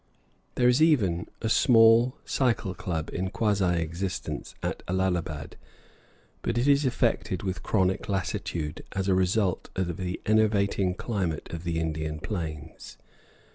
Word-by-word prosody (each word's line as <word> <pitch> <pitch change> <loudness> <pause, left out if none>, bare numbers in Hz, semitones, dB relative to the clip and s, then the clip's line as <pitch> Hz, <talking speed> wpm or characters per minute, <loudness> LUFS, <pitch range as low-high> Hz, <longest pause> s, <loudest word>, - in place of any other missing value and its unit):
There 125 - +3
is 125 +4 +4
even 105 - +3 0.2
a - - +1
small 115 +2 +5
cycle 115 -7 0
club 80 -4 -4
in 95 +1 -2
quasi 100 -4 +1
existence 85 +4 -5
at - - -2
Allahabad; 90 -5 -2 0.8
but 120 - -1
it 120 +3 +1
is 140 -1 +4
afflicted 95 -6 0
with 95 -2 -3
chronic 95 0 0
lassitude, 85 -4 -3
as 95 0 -2
a 95 - +4
result 95 +1 +1
of 90 -3 -2
the 90 -1 -3
enervating 100 -3 +2
climate 95 -8 -3
of 85 0 -5
the 85 -1 -1
Indian 80 -1 -3
plains. 80 -4 -6
95 Hz, 135 wpm, -27 LUFS, 85-110 Hz, 0.8 s, small